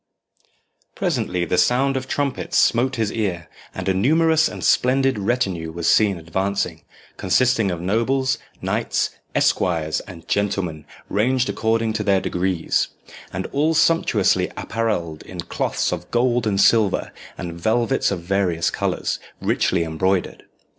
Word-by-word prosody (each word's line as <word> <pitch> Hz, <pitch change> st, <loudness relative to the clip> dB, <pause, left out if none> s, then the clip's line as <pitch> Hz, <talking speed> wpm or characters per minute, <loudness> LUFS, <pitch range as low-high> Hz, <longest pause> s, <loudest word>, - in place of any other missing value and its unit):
Presently 90 Hz, -1 st, -1 dB
the 90 Hz, -, +1 dB
sound 135 Hz, +2 st, +2 dB
of 130 Hz, 0 st, -3 dB
trumpets 140 Hz, -1 st, -1 dB
smote 130 Hz, +3 st, +3 dB
his 110 Hz, -3 st, -1 dB
ear, 95 Hz, -7 st, -2 dB, 0.3 s
and -, -, -5 dB
a 95 Hz, -, +3 dB
numerous 160 Hz, -, +3 dB
and -, -, -7 dB
splendid 135 Hz, -1 st, +2 dB
retinue 95 Hz, -7 st, -1 dB
was 85 Hz, 0 st, -3 dB
seen 100 Hz, -4 st, +4 dB
advancing, 90 Hz, 0 st, -2 dB, 0.4 s
consisting 125 Hz, -5 st, +2 dB
of 85 Hz, -2 st, -3 dB
nobles, 115 Hz, +8 st, +1 dB, 0.2 s
knights, -, -, 0 dB, 0.2 s
esquires, 80 Hz, -4 st, +1 dB
and 85 Hz, -2 st, -11 dB
gentlemen, 90 Hz, -7 st, -1 dB, 0.2 s
ranged 125 Hz, +5 st, +1 dB
according 115 Hz, 0 st, 0 dB
to 105 Hz, 0 st, -2 dB
their 100 Hz, -2 st, +3 dB
degrees, 90 Hz, -2 st, 0 dB, 0.4 s
and 95 Hz, +1 st, -4 dB
all 155 Hz, +3 st, +1 dB
sumptuously 165 Hz, +1 st, +3 dB
apparelled 95 Hz, -9 st, -2 dB
in 90 Hz, -, -10 dB
cloths -, -, -1 dB
of -, -, -5 dB
gold 120 Hz, -1 st, +1 dB
and 100 Hz, -2 st, 0 dB
silver, 105 Hz, -2 st, +3 dB, 0.3 s
and 85 Hz, -2 st, -5 dB
velvets 115 Hz, +9 st, +1 dB
of 95 Hz, -4 st, -3 dB
various 90 Hz, -3 st, 0 dB
colours, -, -, -2 dB, 0.2 s
richly 90 Hz, -2 st, +1 dB
embroidered. 90 Hz, +3 st, -1 dB
100 Hz, 135 wpm, -22 LUFS, 90-125 Hz, 0.4 s, seen